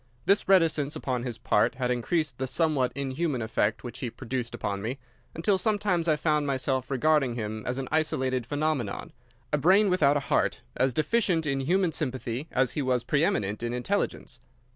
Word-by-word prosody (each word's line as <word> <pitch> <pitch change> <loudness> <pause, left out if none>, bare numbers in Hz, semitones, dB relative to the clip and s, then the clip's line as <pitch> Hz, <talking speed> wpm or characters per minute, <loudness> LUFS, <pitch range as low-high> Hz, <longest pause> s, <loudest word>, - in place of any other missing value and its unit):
This 200 +1 +3
reticence 160 -6 +3
upon 125 -2 -2
his 120 -2 -4
part 115 +4 +1
had 125 -1 -1
increased 130 +2 -1
the 130 - -1
somewhat 140 -2 +1
inhuman 140 -1 -2
effect 110 -1 0
which 120 0 -7
he 125 - -3
produced 120 +1 -5
upon 100 -1 -3
me, 120 +6 -3 0.4
until 190 +4 +2
sometimes 200 -5 +1
I 155 - +4
found 150 -1 0
myself 130 -1 -1
regarding 140 -2 +2
him 110 -1 -4
as 125 +1 -1
an 135 -1 -3
isolated 130 -6 0
phenomenon, 145 -6 -2 0.4
a 150 - +3
brain 190 +6 +4
without 145 -5 +4
a - - -2
heart, 125 - 0
as 130 -1 +1
deficient 180 -1 +1
in 135 -2 0
human 175 +5 +1
sympathy 130 -2 -3
as 130 -1 +2
he 150 - -2
was 125 -3 0
pre 145 +5 +1
eminent 105 -8 0
in 120 0 -2
intelligence. 125 -1 -2
135 Hz, 180 wpm, -27 LUFS, 125-155 Hz, 0.4 s, I